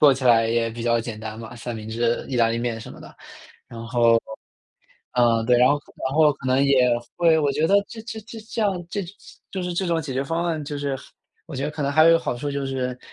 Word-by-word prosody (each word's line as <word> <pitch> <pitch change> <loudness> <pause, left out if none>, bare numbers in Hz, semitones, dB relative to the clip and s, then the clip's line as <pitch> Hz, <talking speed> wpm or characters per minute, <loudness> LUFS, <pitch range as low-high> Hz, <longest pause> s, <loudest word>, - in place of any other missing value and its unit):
做 145 -2 +7
起 130 0 -4
来 115 -2 +5
也 115 0 +1
比 115 +1 -7
较 115 0 +2
简 115 -1 -6
单 110 0 -7
嘛， 115 +1 -9
三 120 0 -5
明 110 0 -7
治、 115 +1 0
意 130 - -2
大 115 -1 +4
利 115 - -1
面 120 -1 -2
什 - - -9
么 - - -13
的。 - - -13 0.5
然 115 -2 -8
后， 115 -1 +4 0.9
嗯， 115 -2 +3
对， 125 -1 +5
然 125 +1 +6
后 145 +1 +3 0.3
然 135 - -5
后 155 -1 +5
可 130 -2 -9
能 130 +2 +3
也 130 -3 +4 0.3
会 165 -2 +4
我 145 -2 +1
觉 155 +1 +1
得 200 - +3
这 225 -2 -9
这 225 -1 -7
这 225 +2 -10
这 220 +1 -6
样 185 -4 -1
这 200 - -2 0.5
就 190 -2 -3
是 180 - -3
这 185 +2 -1
种 170 -1 +1
解 140 -3 -5
决 135 +2 -1
方 165 +4 -1
案， 160 -3 -1
就 145 +1 -5
是， 140 -2 -2 0.5
我 160 - -9
觉 135 - -3
得 150 - -1
可 150 - -8
能 140 0 0
还 155 +2 +6
有 - - +7
一 - - +7
个 165 - +5
好 125 - -3
处 145 +4 -4
就 140 0 -3
是， 125 -1 -3
135 Hz, 290 characters per minute, -23 LUFS, 120-160 Hz, 0.9 s, 做